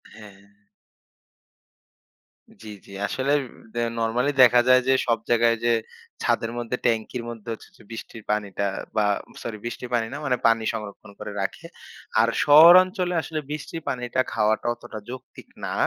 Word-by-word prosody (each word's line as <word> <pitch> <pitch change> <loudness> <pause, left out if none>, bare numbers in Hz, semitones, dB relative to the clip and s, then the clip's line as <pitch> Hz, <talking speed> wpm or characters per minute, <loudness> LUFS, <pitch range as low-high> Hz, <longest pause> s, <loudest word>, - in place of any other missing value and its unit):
হ্যা। 105 -2 -12 2.3
জ্বি, 110 - -10 0.2
জ্বি। 100 - -13
আসলে 135 +2 -1 0.4
দা 120 - -3 0.2
নরমালি 120 +5 +1
দেখা 125 -1 +7
যায় 130 0 +7
যে 135 - +5
সব 115 -1 +3
জায়গায় 115 -1 +3
যে 120 - +4 0.5
ছাদের 115 0 0
মধ্যে 120 +1 -3
ট্যাংকির 115 +1 0
মধ্যে 115 -2 -10
হচ্ছে 110 - -12
যে - - -18
বৃষ্টির 115 0 -9
পানিটা 100 -1 -2 0.3
বা 105 - +2 0.4
সরি 110 -2 -5
বৃষ্টির 120 +1 -6
পানি 115 -2 +1
না 145 - -4
মানে 125 -3 +1
পানি 115 0 +2
সংরক্ষণ 105 -2 -8
করে - - -6
রাখে। 95 - -4 0.6
আর 115 - +3
শহরাঞ্চলে 180 +4 +7
আসলে 160 0 -4
বৃষ্টির 155 +2 -6
পানিটা 125 0 -1
খাওয়াটা 110 +1 +1
অতটা 110 -2 -9
যৌক্তিক 130 +1 -10 0.2
না। - - -3
120 Hz, 145 wpm, -24 LUFS, 110-130 Hz, 2.3 s, দেখা